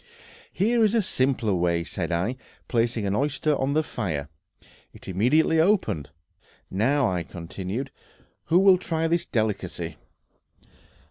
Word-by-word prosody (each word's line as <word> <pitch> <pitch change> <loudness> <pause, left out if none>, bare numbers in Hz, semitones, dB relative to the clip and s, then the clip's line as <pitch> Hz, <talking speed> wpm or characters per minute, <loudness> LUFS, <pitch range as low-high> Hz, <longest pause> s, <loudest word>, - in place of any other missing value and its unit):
"Here 230 +4 +2
is 215 +1 +3
a 230 - +4
simpler 130 - 0
way," 85 -1 +1
said 85 - -4
I, 90 +9 0 0.3
placing 115 -2 0
an 100 - 0
oyster 145 +3 +1
on 135 +1 0
the 155 +1 +2
fire; 80 - -4 0.6
it - - -14
immediately 130 - +3
opened. 160 - +1 0.6
"Now," 125 +7 +2
I 90 -3 -1
continued, 95 - -6 0.5
"who 170 - +3
will 190 -1 +6
try 165 -2 -1
this 170 +1 0
delicacy?" 95 -7 -2
120 Hz, 130 wpm, -25 LUFS, -, 0.6 s, will